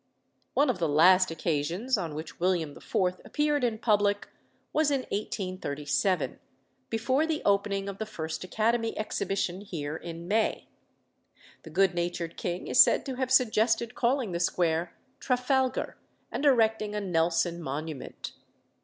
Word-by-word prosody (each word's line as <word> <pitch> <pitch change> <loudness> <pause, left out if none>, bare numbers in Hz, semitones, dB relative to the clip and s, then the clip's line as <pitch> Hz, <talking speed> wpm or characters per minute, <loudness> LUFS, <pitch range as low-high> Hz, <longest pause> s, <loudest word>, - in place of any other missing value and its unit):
One 285 -2 +4
of 220 - -7
the 165 -3 +1
last 185 +5 +6
occasions 165 - -1
on 170 -7 -4
which 155 +1 -7
William 175 -4 +1
IV. 180 -1 -1
appeared 295 -2 0
in 230 -3 +1
public 205 -2 +1 0.4
was 310 -1 +3
in 275 -2 +1
1837, 185 -4 -1 0.5
before 260 +7 +1
the 315 -2 -2
opening 200 0 +1
of 200 -1 -6
the 220 - -3
first 160 -7 -5
Academy 225 +4 0
Exhibition 195 -3 -2
here 160 -7 -5
in 170 +1 -7
May. 220 +3 0 0.9
The - - -11
good 190 +3 +3
natured 175 -1 -3
king 175 +1 -4
is 255 - +6
said - - +1
to 265 -2 -4
have 260 -1 -1
suggested 235 -2 +3
calling 245 -3 0
the 170 - -2
square 170 -1 0 0.2
"Trafalgar," 255 +1 0 0.3
and 295 - -2
erecting 220 -5 +2
a - - 0
Nelson 170 -2 0
monument. 150 0 -5
195 Hz, 140 wpm, -28 LUFS, 170-230 Hz, 0.9 s, last